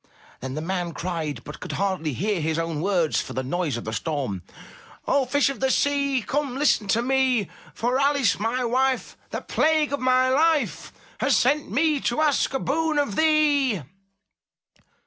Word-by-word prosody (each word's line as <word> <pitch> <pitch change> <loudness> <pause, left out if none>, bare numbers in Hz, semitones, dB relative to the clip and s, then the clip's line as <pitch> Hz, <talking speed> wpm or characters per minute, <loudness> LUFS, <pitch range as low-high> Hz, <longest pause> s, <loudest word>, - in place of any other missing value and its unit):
Then 130 +1 -6
the 155 - -3
man 175 -1 -3
cried, 160 -8 -4
but 150 - -9
could - - -6
hardly 185 -6 -1
hear 195 - -1
his 160 +1 -1
own 165 -2 -2
words 180 -4 +1
for - - -8
the 130 - -2
noise 150 -1 -2
of 120 - -7
the 110 - -4
storm: 125 - -3 0.7
0h 270 -3 +1
Fish 285 0 +3
of 275 - -5
the 265 - +1
Sea, 280 -2 +1
come, 275 0 -2
listen 275 -7 +2
to 230 +4 +1
me. 260 -5 +1 0.3
For 245 +3 0
Alice, 280 -7 +2
my 240 +4 -1
wife, 260 +2 0
the - - -4
plague 310 -2 +1
of 285 - -1
my 255 0 +3
life. 305 +4 +1 0.3
Has - - +3
sent 285 +4 +1
me 295 +6 +2
to 240 +1 -1
ask 300 -3 +2
a - - +1
boon 315 +3 0
of 285 -9 0
thee." 290 - +2
250 Hz, 175 wpm, -24 LUFS, 170-280 Hz, 0.7 s, Fish